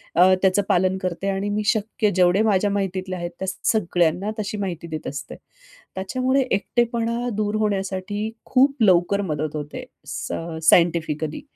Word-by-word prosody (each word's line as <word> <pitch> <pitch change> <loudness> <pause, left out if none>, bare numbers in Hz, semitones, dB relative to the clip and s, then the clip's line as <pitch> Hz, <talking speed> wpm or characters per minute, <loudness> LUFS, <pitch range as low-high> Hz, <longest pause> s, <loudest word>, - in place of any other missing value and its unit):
अ, 185 +2 +6
त्याचं 190 +1 +3
पालन 185 +1 +2
करते. 185 +1 -3
आणि 195 +1 -1
मी 210 +1 -1
शक्य 215 0 +1
जेवढे 185 +2 +4
माझ्या 205 -1 +2
माहितीतले 190 -2 -2
आहेत, 175 -1 -5
त्या 190 - -3 0.2
सगळ्यांना 180 -1 +1
तशी 210 0 -3
माहिती 175 -4 -4
देत 155 -1 -6
असते. 140 0 -6 0.6
त्याच्यामुळे 255 +8 0
एकटेपणा 235 +3 0
दूर 210 0 -1
होण्यासाठी 200 +1 -2
खूप 275 +2 +3
लवकर 185 +1 +4
मदत 150 +1 -3
होते. 150 0 -5 0.2
सायं 165 -1 -5
अ, - - -5
सायंटिफिकली, 160 -3 +2
190 Hz, 145 wpm, -23 LUFS, 175-210 Hz, 0.6 s, अ